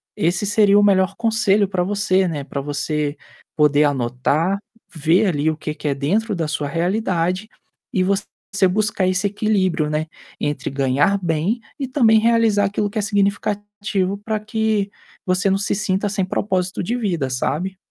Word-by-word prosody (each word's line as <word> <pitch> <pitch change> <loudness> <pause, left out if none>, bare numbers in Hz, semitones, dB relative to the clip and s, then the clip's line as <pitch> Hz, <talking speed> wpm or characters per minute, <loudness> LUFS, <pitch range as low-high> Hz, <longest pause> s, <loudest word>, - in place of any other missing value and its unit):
esse 175 +5 0
seria 205 0 +4
o - - +4
melhor 195 -1 +3
conselho 220 -3 +2
para 190 -2 -1
você, 190 -1 +1
né. 150 -4 -3
Para 140 0 -5
você 145 +1 -2 0.4
poder 150 -1 +4
anotar, 140 +7 0 0.4
ver 165 +6 +2
ali 155 -3 +1
o 155 - -6
que 155 -1 -4
que 150 - -5
é 140 - +2
dentro 205 +11 0
da 165 -3 -2
sua 150 -1 -2
realidade 180 +3 -1 0.5
e 185 - +2
você 200 +2 0 0.4
buscar 205 -1 +1
esse 185 +2 +1
equilíbrio, 195 -6 0
né, 155 +1 -1 0.3
entre 145 -2 -2
ganhar 140 +8 +2
bem 170 +7 0 0.2
e 270 - -2
também 230 -5 +4
realizar 225 -3 +3
aquilo 205 +1 -1
que 205 - -7
é - - +1
significativo 205 -1 -1
para 215 0 -2
que 215 -2 -1 0.4
você 185 +1 +1
não 195 - +2
se 200 - -1
sinta 195 0 0
sem 195 -1 -1
propósito 185 -1 -1
de 230 +7 -1
vida, 170 - -1
sabe. 175 +9 -2
190 Hz, 165 wpm, -20 LUFS, 155-205 Hz, 0.5 s, seria